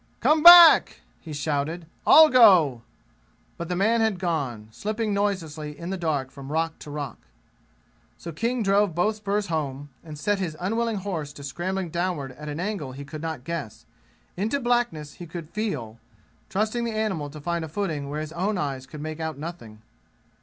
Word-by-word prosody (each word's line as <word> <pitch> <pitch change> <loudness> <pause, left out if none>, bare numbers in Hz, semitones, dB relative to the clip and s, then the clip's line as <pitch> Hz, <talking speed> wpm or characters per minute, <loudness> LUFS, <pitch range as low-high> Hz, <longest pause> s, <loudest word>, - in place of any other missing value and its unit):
"Come 305 0 +3
back!" 345 0 +9 0.2
he 160 - -11
shouted. 150 +3 -2 0.2
"I'll 315 0 +9
go." 180 - +6 0.7
But 170 0 -6
the 180 - -1
man 220 +5 +2
had 220 -4 +1
gone, 140 - -3
slipping 215 - -3
noiselessly 160 -7 -2
in 170 +2 -6
the - - -1
dark 150 -7 -2
from 140 0 -10
rock 165 +1 -1
to - - -10
rock. 145 -5 -6 1.0
So 170 - -8
King 230 +8 -1
drove 200 -3 +2
both 210 +5 +1
spurs 205 0 -1
home, 145 -5 -4
and 155 -2 -9
set 205 +5 0
his 165 -5 -4
unwilling 225 +4 -1
horse 180 -7 -4
to 145 - -11
scrambling 175 +5 -4
downward 170 -6 -2
at 150 +3 -9
an 145 +2 -5
angle 180 -9 -4
he 140 +2 -8
could 150 +2 -8
not 160 -6 -5
guess, 150 -7 -6 0.5
into 220 +9 -1
blackness 240 - -1
he 175 - -9
could 165 -1 -8
feel, 135 - -4 0.5
trusting 215 +4 -1
the 230 -1 -2
animal 190 -10 -2
to 150 +2 -10
find 170 +2 -2
a 160 - -6
footing 155 -5 -3
where 150 +1 -3
his 155 +1 -7
own 195 +4 -1
eyes 135 -5 -4
could 150 +1 -9
make 155 +1 -6
out 160 -2 -4
nothing. 120 -9 -9
170 Hz, 180 wpm, -25 LUFS, 150-205 Hz, 1.0 s, back